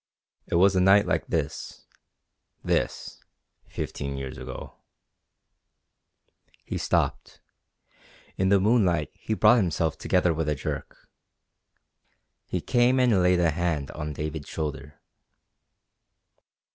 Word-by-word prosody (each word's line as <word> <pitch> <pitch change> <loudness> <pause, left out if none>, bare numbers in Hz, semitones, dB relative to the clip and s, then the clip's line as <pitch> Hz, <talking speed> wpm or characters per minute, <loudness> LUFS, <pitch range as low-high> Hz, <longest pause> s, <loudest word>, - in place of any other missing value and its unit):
"It - - -2
was 95 +3 +4
a 90 - +3
night 95 +2 +5
like - - -1
this 80 -1 -4 0.8
this - - -2 0.5
fifteen 70 -1 -5
years 65 -1 -6
ago...." 65 0 -8 1.9
He - - -4
stopped. - - -1 1.0
In 95 0 +1
the 100 0 +5
moonlight 95 - +2
he 110 - -4
brought 110 +3 +5
himself 85 -6 0
together 90 -2 +2
with 80 -1 -2
a 75 - 0
jerk. - - -6 1.4
He 90 - -2
came 125 +3 +2
and 120 -7 +3
laid 90 0 +3
a 85 -2 +3
hand 80 -4 -2
on 75 -1 -5
David's 75 0 -5
shoulder. 75 -1 -5
85 Hz, 110 wpm, -26 LUFS, 75-95 Hz, 1.9 s, night